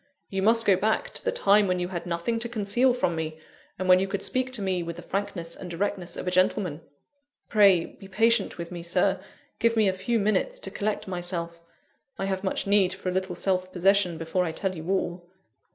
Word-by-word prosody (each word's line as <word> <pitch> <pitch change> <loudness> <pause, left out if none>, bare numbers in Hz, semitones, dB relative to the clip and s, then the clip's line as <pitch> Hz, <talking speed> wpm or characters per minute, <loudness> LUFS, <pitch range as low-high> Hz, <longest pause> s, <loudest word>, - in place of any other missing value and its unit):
You 195 -1 -1
must 230 +3 +4
go 195 - +5
back 215 +4 0
to - - -3
the 485 - +1
time 210 - +4
when 180 0 +1
you 180 0 -2
had 180 -1 -5
nothing 175 +7 -1
to 235 +1 -4
conceal 235 +3 +2
from 175 -9 0
me, 160 -1 -4 0.4
and 185 - -3
when 185 0 +7
you 190 - 0
could 195 0 -3
speak 255 0 0
to 230 - +2
me 185 -2 0
with 170 0 -5
the 175 - -10
frankness 175 -3 -3
and 180 - -8
directness 175 0 -3
of - - -5
a - - +1
gentleman." 180 -3 +1 0.7
"Pray 200 -6 +5
be 195 - -13
patient 225 +2 +2
with 170 0 -6
me, 175 -1 -6
Sir; 170 +1 +1 0.4
give 230 0 +2
me 220 -2 +4
a 190 - +2
few 190 +6 -1
minutes 215 - 0
to - - -4
collect 210 -1 -2
myself. 175 -2 -4 0.6
I 195 - -2
have 190 0 -2
much 190 - -1
need 200 -2 +3
for 185 - -4
a - - -2
little 185 -1 -2
self 185 0 -1
possession 185 -1 +2
before 165 +3 -1
I 170 - -2
tell 190 +2 -2
you 160 +1 -7
all." 175 -2 -2
190 Hz, 220 wpm, -26 LUFS, 175-205 Hz, 0.7 s, when